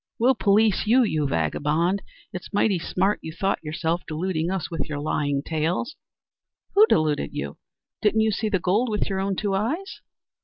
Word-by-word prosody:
"We'll 250 +3 +4
police 210 -1 +2
you, 250 +4 +5
you 155 -9 0
vagabond. 150 - 0 0.3
It's 185 - -7
mighty 205 -2 +2
smart 190 +4 0
you 160 - -6
thought 195 +2 -1
yourself, 160 +2 -1
deluding 165 +1 -2
us 190 -3 -3
with 165 -1 -3
your 150 - -3
lying 145 -1 -1
tales." 165 - -1 0.8
"Who 425 +2 +7
deluded 150 - +1
you? 70 +1 -4 0.4
Didn't 215 +1 +3
you 220 0 +2
see 215 +1 -1
the 200 - +2
gold 200 +8 +1
with 210 -1 -1
your 190 - -1
own 195 0 -1
two 200 +1 -1
eyes?" 275 - -2
190 Hz, 170 wpm, -24 LUFS, 155-215 Hz, 0.8 s, Who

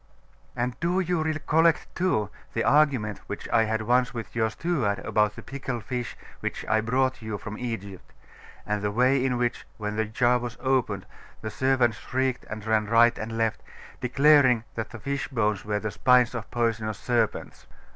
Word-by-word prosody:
'And 120 0 -1
do 175 +3 +1
you 180 -3 0
recollect, 155 +1 +1
too, 110 - 0 0.2
the 115 - 0
argument 135 -8 +3
which 105 - -6
I 115 -1 +4
had 110 0 -1
once 125 +2 +2
with 115 0 -6
your 110 -1 +2
steward 120 - -1
about 105 +1 +1
the - - -9
pickled 130 -4 -5
fish 125 -1 -4 0.2
which - - -4
I 110 0 +3
brought 130 +2 0
you 110 -2 -4
from 105 +1 -7
Egypt; 100 -6 -6 0.5
and 105 0 -1
the 105 - 0
way 125 +5 +3
in 130 -2 +1
which, 120 -1 -2
when 105 0 -4
the 110 - +1
jar 120 +3 +2
was 120 -1 -6
opened, 125 -7 0 0.4
the 110 - -4
servants 125 -1 +2
shrieked 130 0 -2
and 110 -1 -6
ran 110 -1 +1
right 115 +2 +5
and 115 +1 -4
left, 115 -1 0 0.4
declaring 135 -2 +4
that 110 - -4
the 120 - -9
fish 140 +5 -3
bones 110 -6 0
were 105 0 -1
the 105 0 -3
spines 125 +2 +4
of 115 -3 -5
poisonous 115 -3 -1
serpents? 120 -2 -1
120 Hz, 175 wpm, -26 LUFS, 110-130 Hz, 0.5 s, right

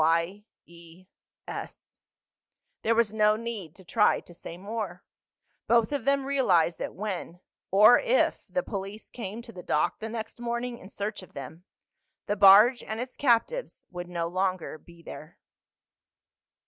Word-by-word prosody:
"Y 165 +5 +1 0.2
E 170 +1 -16 0.4
S." - - -8 0.8
There 230 +1 +2
was 225 -2 +2
no 215 -1 +4
need 215 -8 -6
to 190 - -15
try 210 +4 +3
to 175 - -15
say 170 0 -9
more. 200 -2 -5 0.6
Both 235 0 +3
of 280 -5 -2
them 275 -1 +2
realized 185 - +2
that - - -5
when—or 195 +2 +2
if—the - - +1
police 200 - -6
came 225 0 -6
to 235 - -11
the 185 -4 -9
dock 150 - 0
the 220 - -5
next 225 0 -6
morning 235 0 -3
in 190 - -12
search 210 +1 -4
of 185 - -15
them 150 +6 -9 0.6
the 205 - -1
barge 210 +6 +7
and 220 +1 -5
its 250 +1 -5
captives 280 - 0
would 175 -1 -6
no 170 -1 -2
longer 185 -2 -2
be 170 +2 -17
there. 155 +1 -10
205 Hz, 145 wpm, -28 LUFS, 175-235 Hz, 0.8 s, barge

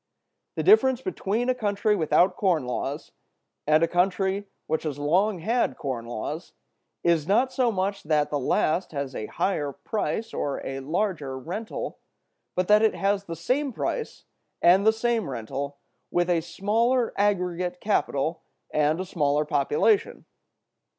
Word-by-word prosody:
The - - -1
difference 265 - +5
between 240 - -2
a 255 - +3
country 210 -2 +1
without 175 +1 +3
corn 175 -9 +1
laws 125 - -4 0.6
and 155 +2 +4
a - - +4
country 190 +3 0 0.2
which 160 - -1
has 150 -3 -4
long 180 +8 +2
had 230 +7 0
corn 125 -4 -4
laws 145 +8 -5 0.5
is 165 -3 +2
not 245 +7 +2
so 250 -3 +2
much 195 0 -1
that 150 -1 +1
the 145 - 0
last 160 +6 0
has 140 -2 -3
a 110 - -4
higher 150 -7 -1
price 205 +8 -3
or 140 - -2
a 135 0 -4
larger 150 -2 -2
rental, 185 - -5 0.6
but 185 0 0
that 210 0 +6
it 220 - +3
has 200 0 0
the 165 - -5
same 260 - 0
price 465 - -4 0.3
and 190 +4 +5
the - - +8
same 225 -4 -1
rental 135 +4 -5 0.3
with 175 0 +1
a 170 -2 +2
smaller 230 +8 +1
aggregate 180 -3 0
capital 165 -6 0 0.3
and 150 +2 +2
a 185 - -2
smaller 150 -4 +1
population. 150 - +1
180 Hz, 150 wpm, -26 LUFS, 150-215 Hz, 0.6 s, the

